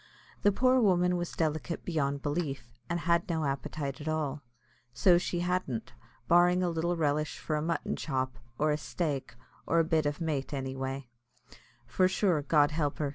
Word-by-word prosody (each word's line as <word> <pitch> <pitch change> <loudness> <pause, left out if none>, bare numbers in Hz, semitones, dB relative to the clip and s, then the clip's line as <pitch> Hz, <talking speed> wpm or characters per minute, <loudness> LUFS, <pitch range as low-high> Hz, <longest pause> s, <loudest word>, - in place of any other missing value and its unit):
The 205 - +5
poor 255 +5 +3
woman 180 -4 +3
was 175 -1 -3
delicate 160 +1 -2
beyond 140 -5 -1
belief, 140 -6 -3 0.2
and 170 0 -1
had 170 0 +1
no 160 -2 0
appetite 140 +1 -3
at 145 - -7
all, 150 -2 -1 0.5
so 175 +9 +5
she 175 -1 -2
hadn't, 180 -10 -2 0.3
barring 175 +1 +5
a 180 - +1
little 170 +2 0
relish 150 -1 0
for 155 - -2
a 150 - 0
mutton 165 +2 -1
chop, 130 -5 -2 0.2
or 150 0 +2
a 150 - +1
"staik," 145 -7 -3 0.3
or 165 - +2
a 165 - +5
bit 160 -2 +1
o' 145 - +1
mait, 150 -4 -2
anyway; 135 0 -4 0.8
for 185 +10 +2
sure, 185 -4 +2
God 145 0 +3
help 150 -2 -1
her! 145 -2 -1
155 Hz, 175 wpm, -30 LUFS, 140-175 Hz, 0.8 s, The